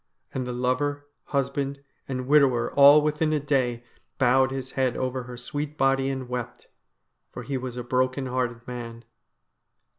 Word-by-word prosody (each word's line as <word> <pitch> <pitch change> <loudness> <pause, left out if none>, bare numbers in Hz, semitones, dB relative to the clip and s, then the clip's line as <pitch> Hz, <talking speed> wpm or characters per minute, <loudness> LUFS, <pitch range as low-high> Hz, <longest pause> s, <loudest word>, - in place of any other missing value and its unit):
And 130 -1 -3
the - - -3
lover, 130 +4 -1 0.2
husband, 140 0 -2 0.2
and 130 -1 -3
widower, 135 -4 +3
all 145 +1 +8
within 150 +1 +1
a 150 - +2
day, 130 -4 0 0.3
bowed 130 0 +4
his 130 -1 -5
head 130 -2 0
over 130 0 -2
her 125 0 -9
sweet 145 +4 -5
body 135 -1 +2
and 130 -2 -4
wept, 125 -1 -5 0.7
for - - -7
he 140 - -4
was 125 -1 -4
a 125 - -4
broken 130 +2 0
hearted 125 -2 -3
man. 115 -2 -7
130 Hz, 155 wpm, -26 LUFS, 125-140 Hz, 0.7 s, all